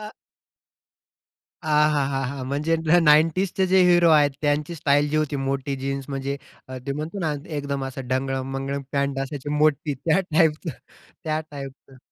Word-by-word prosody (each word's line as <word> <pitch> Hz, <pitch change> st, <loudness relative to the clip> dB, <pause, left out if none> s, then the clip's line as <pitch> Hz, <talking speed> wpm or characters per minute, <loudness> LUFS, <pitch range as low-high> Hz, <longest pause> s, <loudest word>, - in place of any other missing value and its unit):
आ 210 Hz, 0 st, -8 dB, 1.5 s
आ 155 Hz, -, -4 dB, 0.2 s
हा 145 Hz, -2 st, +1 dB
हा 135 Hz, -1 st, -2 dB
हा! 135 Hz, +1 st, -5 dB
म्हणजे 145 Hz, +5 st, 0 dB
न 165 Hz, +2 st, +3 dB
नाइंटीजचे 165 Hz, +5 st, +3 dB
जे 190 Hz, 0 st, +5 dB
हिरो 175 Hz, -1 st, +5 dB
आहेत 145 Hz, -2 st, +5 dB
त्यांची 150 Hz, +2 st, 0 dB
स्टाईल 145 Hz, -1 st, +2 dB
जी 155 Hz, -, -1 dB
होती 155 Hz, -1 st, -1 dB
मोठी 135 Hz, 0 st, -2 dB
जीन्स 135 Hz, 0 st, -4 dB
म्हणजे 135 Hz, 0 st, -3 dB, 0.5 s
ते -, -, 0 dB
म्हणतो 155 Hz, +7 st, -5 dB
ना 160 Hz, -4 st, 0 dB, 0.2 s
एकदम 140 Hz, -2 st, -3 dB
ढंगळम-मंगळम 135 Hz, +1 st, -2 dB
पँट 140 Hz, -1 st, 0 dB
असायची 145 Hz, 0 st, -6 dB
मोठी 150 Hz, 0 st, +1 dB
त्या 155 Hz, +7 st, +1 dB
टाइपचं 160 Hz, +1 st, +2 dB, 0.5 s
त्या 155 Hz, -1 st, -1 dB
टाइपचं. 135 Hz, -1 st, -10 dB
145 Hz, 150 wpm, -24 LUFS, 135-155 Hz, 1.5 s, जे